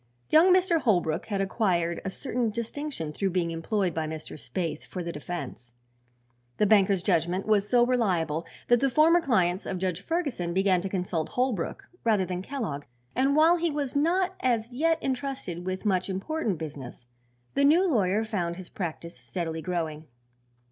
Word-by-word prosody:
Young 345 +4 +7
Mr. 360 -2 +4
Holbrook 175 -7 +1
had 200 -3 -1
acquired 180 -4 0
a 195 - -2
certain 245 +2 -2
distinction 235 - -4
through 195 +5 0
being 175 -2 0
employed 180 +2 -1
by 160 -1 -2
Mr. 155 0 -6
Spaythe 155 +3 -4
for 180 - -6
the 170 - -4
defense. 150 -6 -7 0.8
The 210 - +3
banker's 195 -3 +4
judgment 180 0 +1
was 210 -1 +2
so 240 -1 +5
reliable 175 -10 0 0.2
that 240 0 +5
the 275 - +2
former 320 +6 +5
clients 190 - +1
of 185 - -2
Judge 180 -1 -2
Ferguson 260 - -2
began 190 -2 +3
to 195 - -4
consult 180 -4 -2
Holbrook 245 -9 -2 0.2
rather 215 -5 +3
than 180 0 -3
Kellogg 195 - -4 0.3
and 270 +3 +2
while 325 +3 +6
he 340 0 0
was 285 -3 -3
not 355 +6 +2
as 235 -2 0
yet 325 +6 +2
entrusted 260 -10 -3
with 185 +3 -3
much 185 -2 +1
important 200 - -2
business 140 -6 -8 0.5
the 280 - +2
new 330 +7 +5
lawyer 215 - +2
found 185 -6 -2
his 185 0 -9
practice 170 -2 -5
steadily 160 +7 -4
growing. 160 -3 -3
195 Hz, 165 wpm, -27 LUFS, 170-255 Hz, 0.8 s, Young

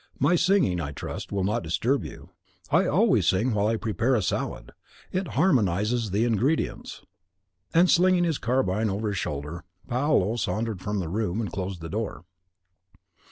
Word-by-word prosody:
My 150 +6 +3
singing, 170 - +2
I 70 -2 -5
trust, - - -6
will 100 -2 -1
not 105 +5 0
disturb 115 - 0
you. - - -10 0.4
I - - +4
always - - +3
sing 110 +6 +2
while 105 0 +1
I 115 - +1
prepare 115 +4 0
a 110 - +1
salad; - - -3 0.4
it 185 0 -2
harmonises 110 - +2
the 105 +5 +1
ingredients." 120 +7 -1 0.7
And 170 +2 +5
slinging 180 0 +4
his 165 -4 0
carbine 110 -4 0
over 105 +2 -2
his 100 -3 -2
shoulder, 75 +4 -5 0.2
Paolo 120 -5 +1
sauntered 110 -3 -2
from 105 +1 -2
the 90 -4 -2
room, 100 +2 -2
and 105 -6 -3
closed 95 -2 -4
the 80 - -6
door. 105 -4 -4
110 Hz, 160 wpm, -26 LUFS, 95-130 Hz, 0.7 s, And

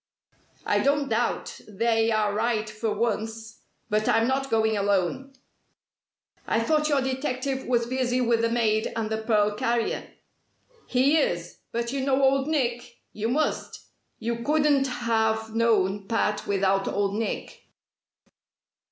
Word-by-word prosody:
"I - - +2
don't 280 0 +1
doubt 235 +1 -1
'they' 225 +2 +1
are 210 -2 +1
right 220 0 0
for 215 +1 -3
once! 220 0 -3 0.3
But 215 +1 0
I'm 225 +1 +3
not 270 +1 -1
going 220 -1 +2
alone." 200 +6 0 1.1
"I 225 - +2
thought 305 +6 +1
your 285 -2 +2
detective 265 0 -2
was 240 -2 +2
busy 255 0 0
with 235 -2 +2
the 230 - +2
maid 220 -2 +1
and 220 -1 -2
the 220 - -1
pearl 210 -2 +2
carrier." 230 +2 -1 0.8
"He 270 +5 +3
is. 175 - -2
But 235 0 -2
you 275 0 -2
know 270 0 +1
Old 270 +1 +3
Nick? 240 -6 -1 0.2
You 215 +2 -2
must! 300 +5 -1 0.4
You 230 +1 -2
couldn't 290 -2 +3
have 220 -3 0
known 205 -4 +1
Pat 210 -1 0
without 195 -1 +1
Old 200 -1 0
Nick." 220 +1 -4
230 Hz, 135 wpm, -26 LUFS, 215-260 Hz, 1.1 s, I'm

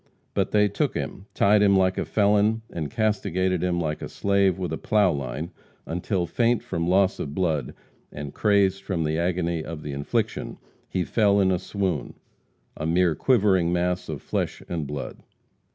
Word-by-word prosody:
But - - 0
they 105 -1 +4
took 100 - -1
him, 95 - -5
tied 105 +1 +4
him 100 -1 +5
like 95 -1 +3
a - - -1
felon, 105 +2 +2
and 80 -4 -4
castigated 95 -5 0
him 90 -1 0
like 75 -2 -2
a - - -5
slave 100 -2 +2
with 90 -4 -3
a - - -2
plow 105 -4 +3
line, 70 +4 -4 0.3
until 90 +2 -1
faint 115 +7 +1
from 85 0 -2
loss 95 +1 +3
of 70 0 -5
blood 80 -8 -1 0.4
and 75 -1 -7
crazed 100 -2 +2
from 90 -5 -2
the 80 +1 0
agony 85 -2 -1
of 80 -1 -7
the 75 - -5
infliction, 70 +1 -2 0.3
he 90 - 0
fell 100 0 +3
in 95 -1 +3
a 90 - +1
swoon 95 - -3 0.6
a 75 - -3
mere 85 0 +3
quivering 95 - +3
mass 90 +1 -1
of - - -5
flesh - - -3
and 80 -4 -3
blood. 70 -1 -6
90 Hz, 175 wpm, -25 LUFS, 80-100 Hz, 0.6 s, him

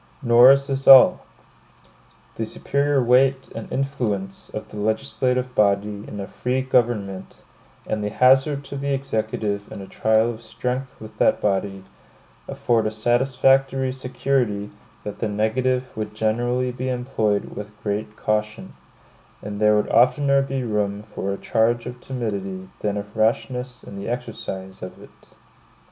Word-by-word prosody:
Nor 120 +1 +7
is 140 0 +5
this 135 -1 -3
all. 135 -1 +9 1.1
The - - -4
superior 140 -1 0
weight 130 +2 +3
and 115 - -8
influence 120 -8 -3
of 110 - -7
the 105 - -8
legislative 125 +4 -1
body 105 -1 +1
in 105 - -7
a 100 - -4
free 125 +5 -2
government, 110 -7 -1 0.4
and 105 -1 -2
the 105 - -1
hazard 135 +5 +3
to 140 - -8
the 140 0 -1
Executive 110 -5 -3
in - - -7
a 100 - -7
trial 110 +3 +2
of 115 -1 -10
strength 125 +4 -4
with 110 0 -11
that - - +3
body, 95 -1 -1 0.6
afford 115 -3 0
a - - +1
satisfactory 130 +3 +2
security 125 -5 -1 0.3
that 105 - -7
the 110 - -1
negative 125 +5 -1
would 105 -1 -5
generally 120 +3 0
be 130 +1 -4
employed 120 -5 -1
with 105 0 -6
great 105 +1 -3
caution; 105 +1 -2 0.7
and 100 0 -6
there 105 0 +5
would 105 - 0
oftener 140 +4 +4
be 135 -1 -3
room 105 -2 -2
for 100 -2 -5
a 100 - -3
charge 115 +2 +1
of 125 0 -8
timidity 100 -7 -4
than 105 -1 -2
of 105 0 -7
rashness 125 +3 -1
in 100 - -10
the 100 +3 -5
exercise 115 -6 -6
of 90 - -8
it. - - -14
115 Hz, 150 wpm, -22 LUFS, 105-130 Hz, 1.1 s, all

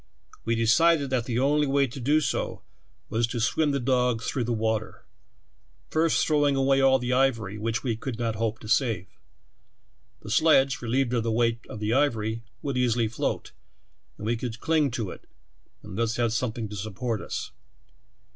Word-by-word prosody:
We 115 - +1
decided 140 +6 +3
that 125 -3 0
the 120 - -3
onl}" 145 +4 +2
wa}" 140 0 +3
to 130 +1 -8
do 145 +5 +2
so - - -2 0.5
was 115 +1 +1
to 120 0 -4
swim 120 +7 +1
the 140 -1 0
dogs 125 -2 +1
through 125 -4 -1
the 120 - -2
water, 110 -1 -2 0.9
first 160 0 +2
throwing 145 -2 +2
awa} 135 0 +3
all 135 0 +5
the 125 -1 -3
ivor3q 115 -6 +1
which 110 +1 -2
we 120 -4 0
could 115 +1 -5
not 115 -2 -1
hope 110 0 -2
to 110 - -9
save. 110 -6 +1 1.2
The 105 - -8
sledge, 135 -2 +4
relieved 125 +1 0
of 120 - +2
the 115 0 -1
weight 115 0 +1
of - - -7
the 105 +1 0
ivor}", 115 -6 +1 0.3
would 140 -3 -2
easity 120 -3 +1
float, - - -3 0.7
and 105 - -7
we 115 +2 +1
could 115 -1 -5
cling 155 -1 +2
to 115 -5 -3
it, - - -12 0.6
and 95 - -9
thus 115 +1 0
have 120 -2 +1
something 115 -1 -2
to 105 - -7
support 110 +2 -3
us. - - -5
120 Hz, 180 wpm, -26 LUFS, 110-135 Hz, 1.2 s, all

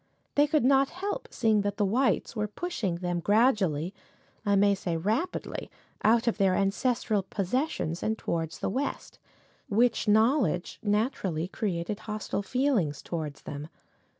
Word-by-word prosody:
They 290 +1 +4
could 300 -4 +2
not 270 0 +4
help 400 +7 -4
seeing 220 -3 +2
that 205 0 -2
the 210 - +2
whites 245 +5 +1
were 210 -1 -1
pushing 210 - -3
them 175 0 -2
gradually 195 - +2 0.5
I 205 -2 +2
may 200 +1 +5
say 180 -4 -2
rapidly 220 - -2 0.3
out 230 +2 +4
of 235 -2 0
their 190 -2 +4
ancestral 210 +2 +1
possessions 195 - -2
and 220 0 0
towards 165 -4 -3
the - - -2
West, 275 +7 -3 0.5
which 230 +2 +2
knowledge 215 - +2
naturally 205 - 0
created 190 0 -3
a - - -16
hostile 210 -1 -3
feeling 245 - +1
towards 155 -2 -6
them. 145 +1 -6
210 Hz, 145 wpm, -28 LUFS, 180-245 Hz, 0.5 s, may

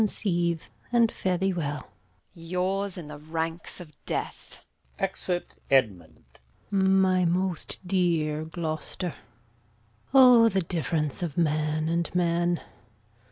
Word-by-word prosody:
Conceive, 175 -6 0 0.2
and 235 -2 +4
fare 185 -1 -1
thee 190 +1 +1
well. 150 -4 -3
Edm. - - -25 0.4
Yours 185 +3 -2
in 170 -4 -7
the 150 -1 -8
ranks 160 +3 -4
of 170 -4 -10 0.2
death! - - -5 0.3
Exit. 185 -2 -2 0.2
Gon. 95 - +1 0.5
My 190 -1 +3
most 180 +1 -1
dear 165 -5 +1
Gloucester! 160 +1 -4 1.0
O, 250 -4 +8
the 190 -3 0
difference 160 -3 -1
of 170 -4 -4
man 155 -1 +1
and 170 +1 0
man! 175 0 +1
170 Hz, 115 wpm, -27 LUFS, 155-190 Hz, 1.0 s, O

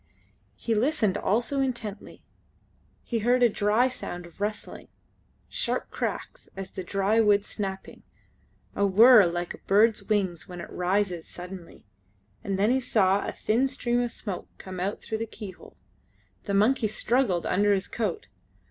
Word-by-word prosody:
He 230 - -2
listened 220 - +1
also 235 +8 0
intently. 225 -6 -5 0.8
He 235 - -2
heard 245 +3 +3
a 240 - +6
dry 210 +4 +2
sound 180 -8 -6
of 175 +3 -16
rustling; 210 +1 -4 0.6
sharp - - -2
cracks - - -5
as 195 0 -8
of 185 -2 -6
dry 200 +3 +1
wood 205 -1 +3
snapping; 195 -2 -5 0.7
a 200 - +1
whirr 210 +1 +7
like 175 0 -3
of - - -12
a - - -38
bird's 215 +3 +4
wings 190 -6 -1
when 180 -1 -8
it - - -8
rises 180 -2 -1
suddenly, 180 - -10 0.6
and 195 -1 -2
then 205 +4 +3
he 260 - +3
saw 200 -5 +2
a - - -2
thin 240 +5 +1
stream 245 -2 -1
of 240 - -1
smoke 200 -6 -6
come 185 -1 -8 0.2
through 220 - -4
the 225 - -3
keyhole. 205 -4 -11 0.7
The 200 - -1
monkey 220 +3 +3
struggled 215 -4 0
under 205 +2 +2
his 195 -1 +1
coat. 235 - -3
205 Hz, 155 wpm, -27 LUFS, 190-235 Hz, 0.8 s, whirr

